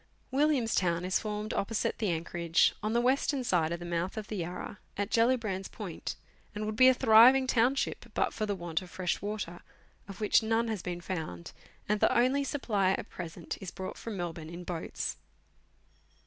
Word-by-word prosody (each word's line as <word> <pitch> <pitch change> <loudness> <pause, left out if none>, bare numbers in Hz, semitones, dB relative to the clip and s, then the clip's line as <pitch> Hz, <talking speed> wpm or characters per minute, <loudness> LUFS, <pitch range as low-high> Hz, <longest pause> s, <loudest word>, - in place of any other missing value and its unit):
Williams 275 -4 +2
Town 170 -1 +1
is 185 - +1
formed 210 0 -3
opposite 215 +2 -1
the 215 -4 0
anchorage, 170 0 +2
on 215 +1 -1
the 235 - +3
western 265 +2 +1
side 170 -8 +1
of 170 - -2
the 175 - -7
mouth 175 +4 -2
of 215 -1 -5
the 215 - -3
Yarra, 180 +3 -5 0.2
at 200 0 -2
Gellibrand's 230 -5 +1
Point, - - -6 0.4
and 210 +1 -3
would 215 0 -3
be 255 +3 +7
a 260 - +8
thriving 250 +2 +7
town 255 +1 +3
ship 250 - -2
but - - +1
for 215 - -2
the 205 - -1
want 170 -2 -2
of 185 - -11
fresh 180 -1 -2
water, 205 -4 -4 0.5
of 195 -1 -9
which 210 +1 +4
none 225 +1 +1
has 215 -5 -2
been 175 -1 -4
found, 160 - -5 0.4
and 210 0 +1
the - - +3
only 260 +4 +3
supply 210 -10 +1
at - - -4
present 170 -1 -6
is 190 - -5
brought 190 +1 -6
from 225 -3 -6
Melbourne 165 -3 -5
in 170 +1 -7
boats. 175 -2 -4
205 Hz, 190 wpm, -30 LUFS, 175-230 Hz, 0.5 s, a